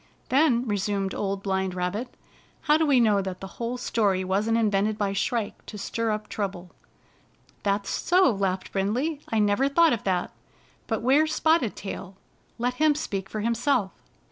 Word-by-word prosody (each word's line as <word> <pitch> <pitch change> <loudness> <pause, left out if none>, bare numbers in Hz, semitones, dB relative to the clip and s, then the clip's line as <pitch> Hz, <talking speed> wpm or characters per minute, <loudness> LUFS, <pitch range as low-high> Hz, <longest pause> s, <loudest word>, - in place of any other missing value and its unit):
" - - -36
Then," 260 -3 +3
resumed 200 -2 -1
Old 195 -1 -3
Blind 190 -2 -1
Rabbit, 195 +7 -3 0.5
"how 300 -1 +3
do 315 0 +2
we 275 -3 +5
know 210 -4 +4
that 190 -1 -5
the - - -7 0.2
whole 235 +2 -2
story 205 -6 +1
wasn't 205 +5 +1
invented 210 -1 +1
by 200 -2 -1
Shrike 220 +2 -2
to 210 - -7
stir 230 +3 -2
up 215 0 -2
trouble?" 190 -4 -4 0.5
" - - -34
That's 200 0 -1
so," 365 -3 +3
laughed 195 -2 -2
Brindley. 250 +11 -1
" - - -18
I 225 - +1
never 210 +6 +2
thought 330 +2 +4
of 230 - -3
that. 185 -2 0 0.6
But 225 -1 -2
where's 305 +5 +3
Spotted 315 -10 +2
Tail? 195 -1 -7 0.4
Let 245 +1 0
him 310 -1 +5
speak 200 -9 -4
for 215 - -4
himself." 235 -2 +1
215 Hz, 175 wpm, -26 LUFS, 195-250 Hz, 0.6 s, we